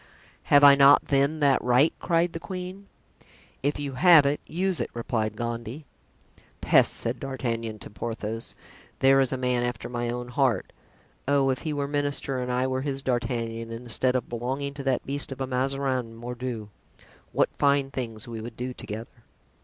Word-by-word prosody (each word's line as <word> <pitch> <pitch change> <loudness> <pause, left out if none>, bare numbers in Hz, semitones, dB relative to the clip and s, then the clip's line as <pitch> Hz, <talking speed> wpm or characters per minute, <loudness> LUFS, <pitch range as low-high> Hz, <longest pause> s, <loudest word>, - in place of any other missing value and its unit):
"Have 145 0 +5
I 140 -1 +10
not, 140 +1 +6
then, 140 +3 +2
that 140 -3 +3
right?" 125 +5 +4
cried 170 0 +1
the 165 - -4
queen. 185 +2 -7 0.7
"If 145 +2 -1
you 140 -2 -4
have 165 +1 +7
it, 140 +1 0
use 185 +1 -1
it," - - -2
replied 110 -2 -2
Gondy. 120 +5 -5 0.7
("Peste!" - - +4
said 115 +1 0
D'Artagnan 115 -5 -3
to - - -10
Porthos. 115 +2 -5 0.4
"There 135 0 +5
is 135 -2 +2
a 130 - -1
man 125 -1 0
after 120 -2 -3
my 120 -1 -2
own 120 0 -4
heart. 125 -1 0 0.5
Oh! 140 -1 +3
if 130 - -2
he 155 - -3
were 145 -1 -2
minister 145 -2 -1
and 125 0 -3
I 125 +1 +1
were 130 0 -1
his 135 -1 -3
D'Artagnan, 115 -2 -2
instead 120 +2 -1
of 130 - -1
belonging 130 +4 -3
to 140 -1 -7
that 130 -2 0
beast 140 0 -2
of 135 - -7
a 135 - -1
Mazarin, 130 -2 -1
mordieu! 120 -2 -5 0.6
what - - +1
fine 140 -1 +2
things 115 -5 -5
we 115 -2 -6
would 115 0 -8
do 125 +1 -4
together!" 115 +1 -8
130 Hz, 175 wpm, -26 LUFS, 120-140 Hz, 0.7 s, I